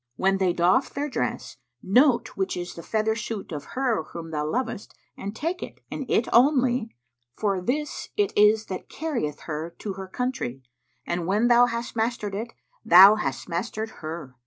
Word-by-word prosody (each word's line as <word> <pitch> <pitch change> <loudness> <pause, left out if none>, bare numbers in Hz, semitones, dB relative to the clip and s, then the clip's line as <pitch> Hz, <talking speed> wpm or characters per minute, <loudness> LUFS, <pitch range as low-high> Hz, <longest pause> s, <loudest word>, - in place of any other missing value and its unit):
When 195 +4 +2
they 185 -2 +3
doff 175 +9 +2
their 290 +1 -3
dress - - -3 0.3
note 245 +5 +4
which 190 -2 -3
is 175 0 -5
the 170 - -9
feather 220 +3 0
suit 220 -3 -5
of 145 -3 -5
her 250 -9 +1
whom 165 -1 -8
thou 150 -1 -2
lovest 230 +2 -3 0.2
and 200 +2 -6
take 335 +8 -3
it, - - -8
and 270 - -5
it 230 - +2
only, 250 -3 +3 0.4
for 200 -3 0
this 295 +9 -3
it 410 -2 +1
is 210 +1 +5
that 185 - -7
carrieth 245 - -3
her 160 +2 -5
to 205 - -5
her 190 0 -7
country, 190 - -3 0.4
and 175 -1 -2
when 210 +5 +2
thou 240 0 +6
hast 235 +1 -4
mastered 220 -2 -1
it, 225 +4 -4 0.3
thou 190 +4 +9
hast 175 -11 -3
mastered 220 +5 -3
her. 155 -4 -6
215 Hz, 175 wpm, -25 LUFS, 175-245 Hz, 0.4 s, thou